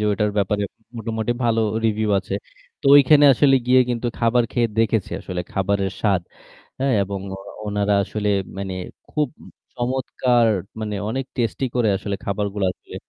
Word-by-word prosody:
যে - - 0
ওটার 105 +1 +1
ব্যাপারে 100 +1 +1 0.3
মোটামুটি 110 +1 -2
ভালো 115 -1 +2 0.2
review 110 -1 +1
আছে। 95 0 -5 0.5
তো - - -4
ওইখানে 145 +1 +6
আসলে 135 +2 +4
গিয়ে 130 +1 +6
কিন্তু 120 0 -2
খাবার 120 +1 +3
খেয়ে 120 -2 +2
দেখেছি 110 -3 +1
আসলে 90 -1 -4
খাবারের 95 0 0
স্বাদ, 100 -4 +2 0.6
এ - - +1 0.2
এবং 100 0 -4 0.2
ও - - -10 0.3
ওনারা 105 0 +1
আসলে 105 0 -3 0.3
মানে 95 -1 -4 0.4
খুব 150 -2 0
উম - - -13 0.3
চমৎকার 125 -1 +1 0.3
মানে 105 -1 -3
অনেক 130 +4 -2
tasty 120 +2 -1
করে 120 -3 +3
আসলে 100 +1 -3
খাবারগুলো 100 0 -2
আসলে - - -15
110 Hz, 155 wpm, -22 LUFS, 100-120 Hz, 0.6 s, ওইখানে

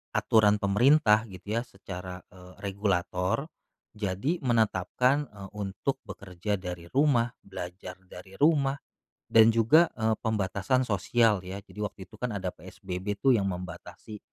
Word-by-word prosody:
aturan 105 -2 +4
pemerintah 110 +1 +4
gitu 100 +4 -4
ya - - -2
secara, 90 -1 -8
eee, 90 0 -14
regulator. 95 - -1 0.5
Jadi 105 - -1
menetapkan, 125 +4 +2
eee, 100 -2 -11
untuk 105 +6 -3
bekerja 95 +2 -4
dari 90 -2 -7
rumah, 130 - +3
belajar 90 -1 -8
dari 95 +1 -12
rumah, 145 -3 +3 0.6
dan 110 0 +7
juga, 145 +10 +5
eee, 110 0 +2
pembatasan 105 +3 0
sosial 105 0 +2
ya. 95 +2 -5
Jadi 105 - -17
waktu 105 -1 -5
itu - - -17
kan 125 - -2
ada 95 -2 -2
PSBB 95 +3 -5
tuh 135 -2 +4
yang 100 -3 +1
membatasi, 90 +3 -8
105 Hz, 135 wpm, -28 LUFS, 95-115 Hz, 0.6 s, dan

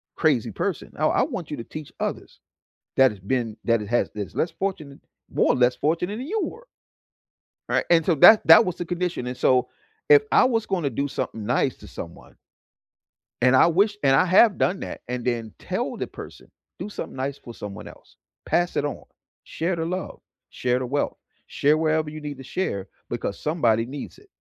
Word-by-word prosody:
crazy - - +1
person. - - -3
I - - +1
I - - +2
want 225 - -5
you 145 - -3
to 115 - -6
teach 155 +4 -9
others - - -4 0.6
that 130 -3 +5
it's 100 - -13
been 115 +1 -2
that 115 -2 +2
it 105 - -8
has 120 +2 +1
this 105 -2 -6
less 165 - 0
fortunate, 155 -8 -4 0.3
more - - +2
or - - 0
less 125 0 +3
fortunate, 170 +6 -1
than 260 - -5
you 430 +5 -1
were." 460 +9 -8 1.0
Right? - - +1
And 165 -2 +5
so 175 - +3
that 215 +9 +8
that 230 - +9
was 180 - -3
the 175 - -4
condition. 175 -6 -3
And 125 0 -4
so 125 -1 +2 0.4
if 145 -1 +8
I - - +6
was 230 -3 +1
gonna 175 -8 -1
do 140 +5 -2
something 115 -5 -4
nice 125 +3 +1
to - - -13
someone - - -10 1.1
and 130 +1 +5
I - - +7
wish 200 +5 +2
and 135 -1 +4
I 185 - +4
have 195 +3 +5
done 190 +1 +1
that, - - -6
and 125 -1 -4
then 115 -3 -2
tell - - -3
the - - -3
person, - - -12 0.3
"Do - - -5
something - - -7
nice 135 +1 -3
for 120 -4 -11
someone 100 -2 -8
else. - - -17 0.3
Pass 175 +1 +1
it 145 - +1
on. 145 - -4 0.4
Share 170 +2 -2
the 160 - -2
love. 185 +2 -5 0.3
Share 125 0 0
the 130 - -3
wealth. 145 +3 -1 0.3
Share 150 +2 +2
wherever 155 -1 +1
you 155 0 -8
need 145 -2 -6
to 135 - -10
share, 100 - -3 0.2
because 100 - -4
somebody 120 -8 +1
needs 140 +2 -8
it." 410 - -20
145 Hz, 200 wpm, -24 LUFS, 125-175 Hz, 1.1 s, that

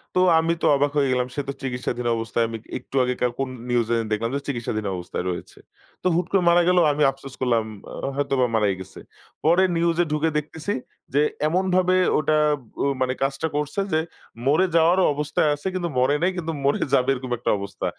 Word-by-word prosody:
তো - - +4 0.2
আমি 165 +1 +1
তো - - 0
অবাক 145 +1 +1
হয়ে 140 -2 +3
গেলাম। 125 0 +1
সে 145 - -1
তো 140 - -2
চিকিৎসাধীন 125 -2 -3
অবস্থায়, 115 +1 -1
আমি 115 0 -5 0.2
একটু 130 - -12
আগেকার 125 -1 0
কোন 135 -1 -1 0.2
নিউজে 120 -1 +1 0.2
দেখলাম 110 +2 0
যে - - 0
চিকিৎসাধীন 115 -5 -3
অবস্থায় 90 0 -5
রয়েছে। 90 - -6 0.5
তো - - +2
হুট 175 +1 +1
করে 195 -2 +3
মারা 175 +1 +5
গেলো 180 -1 +5
আমি 150 +1 +1
আফসোস 135 0 -12
করলাম, 120 -3 +2 0.3
আ - - -7 0.2
হয়তোবা 135 -2 +1
মারাই 105 -3 +2
গেছে। 95 - -11 0.5
পরে 175 +4 +5
নিউজে 170 +1 +2
ঢুকে 150 +1 +1
দেখতেছি, 155 +6 -3 0.4
যে 145 - +4 0.3
এমনভাবে 185 +2 +2 0.2
ওটা 155 0 +2 0.5
ও - - +2 0.2
মানে 130 0 +1
কাজটা 135 +3 -1
করছে 150 +5 -2
যে, 155 - +4 0.5
মরে 155 +7 +4
যাওয়ার 170 +3 +5
অবস্থায় 150 +1 0
আছে 145 +6 -6
কিন্তু 180 -2 -2
মরে 130 +3 +3
নাই 180 +2 +2
কিন্তু 165 -2 -3
মরে 140 - +2
যাবে 130 -1 +3
এরকম 130 -1 -6
একটা 120 - 0
অবস্থা। 100 0 -5
140 Hz, 190 wpm, -23 LUFS, 125-165 Hz, 0.5 s, মারা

